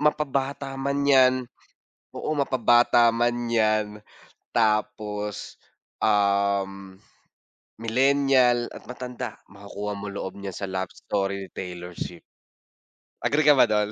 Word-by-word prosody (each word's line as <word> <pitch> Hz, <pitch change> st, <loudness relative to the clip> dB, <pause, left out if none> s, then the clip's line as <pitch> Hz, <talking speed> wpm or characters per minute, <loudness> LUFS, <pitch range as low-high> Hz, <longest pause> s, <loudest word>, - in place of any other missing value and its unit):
Mapa 150 Hz, 0 st, +3 dB
bata 135 Hz, 0 st, -3 dB
man 140 Hz, +1 st, -1 dB
'yan, 130 Hz, -2 st, +6 dB, 0.8 s
oo, -, -, -4 dB
mapa 135 Hz, -3 st, 0 dB
bata 120 Hz, 0 st, +5 dB
man 120 Hz, 0 st, 0 dB
'yan 110 Hz, -2 st, +1 dB, 0.5 s
tapos, 105 Hz, -2 st, -1 dB, 0.4 s
um, 100 Hz, -2 st, +1 dB, 0.9 s
millennial 130 Hz, 0 st, +3 dB
at -, -, -11 dB
matanda, 125 Hz, -2 st, -6 dB
makukuha 100 Hz, +1 st, -6 dB
mo 100 Hz, +1 st, -6 dB
loob 95 Hz, -1 st, -5 dB
niya 100 Hz, -1 st, -6 dB
sa 100 Hz, -, -5 dB
Love 95 Hz, 0 st, -3 dB
Story 100 Hz, -1 st, -2 dB
ni 95 Hz, -, -12 dB
Taylor 90 Hz, -1 st, -7 dB
Swift. 85 Hz, -1 st, -6 dB, 1.0 s
Agree 150 Hz, +2 st, +2 dB
ka 150 Hz, -, +7 dB
ba 125 Hz, -3 st, +5 dB
do'n? 105 Hz, -1 st, +1 dB
110 Hz, 120 wpm, -25 LUFS, 100-130 Hz, 1.0 s, ka